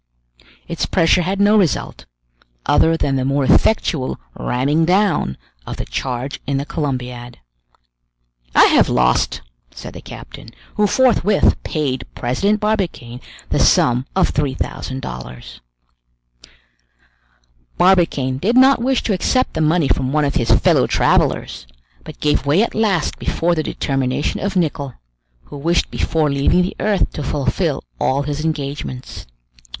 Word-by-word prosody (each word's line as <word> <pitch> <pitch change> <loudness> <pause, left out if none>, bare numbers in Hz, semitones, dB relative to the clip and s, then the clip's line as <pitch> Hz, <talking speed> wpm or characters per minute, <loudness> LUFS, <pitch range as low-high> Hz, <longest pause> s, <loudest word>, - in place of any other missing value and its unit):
Its 170 -1 -3
pressure 180 0 +3
had 190 +3 -2
no 205 +1 +4
result, 190 -7 0 0.6
other 165 0 +3
than 135 -3 0
the 130 - -1
more 140 +1 0
effectual 155 -3 +1 0.2
ramming 140 +6 0
down 180 - +1 0.3
of - - -6
the - - -4
charge 130 +2 -4
in 140 -1 0
the 140 - -3
Columbiad. 125 -6 -4 1.2
"I - - +8
have - - +4
lost," 60 0 +1 0.3
said - - -10
the - - -10
captain, - - -11 0.2
who 210 0 +2
forthwith 215 -5 +3
paid 140 -5 -3
President 195 - 0
Barbicane 185 - -2 0.3
the - - 0
sum 125 +2 +3
of 190 - +2
three 145 -3 -1
thousand 130 0 -5
dollars. 60 0 -9 2.2
Barbicane 165 -8 +2
did 230 - +1
not 265 -1 +5
wish 260 +1 0
to 215 - 0
accept 255 +7 0
the 160 - -2
money 155 0 +2
from 130 0 0
one 150 0 +1
of 140 - -1
his 115 - -1
fellow - - +3
travelers, - - 0 0.4
but - - -11
gave 150 -2 0
way 160 +9 +4
at - - -3
last 205 -7 0
before 175 +1 0
the 160 - 0
determination 135 -1 -2
of 200 0 -3
Nicholl, 145 -7 -1 0.5
who 145 - -11
wished 170 +5 0
before 155 -3 0
leaving 140 +6 +2
the 180 - -4
earth 210 -3 0
to - - -5
fulfill 140 0 -1 0.2
all 140 +2 +1
his 145 +1 -4
engagements. 140 - -5
150 Hz, 140 wpm, -18 LUFS, 130-185 Hz, 2.2 s, I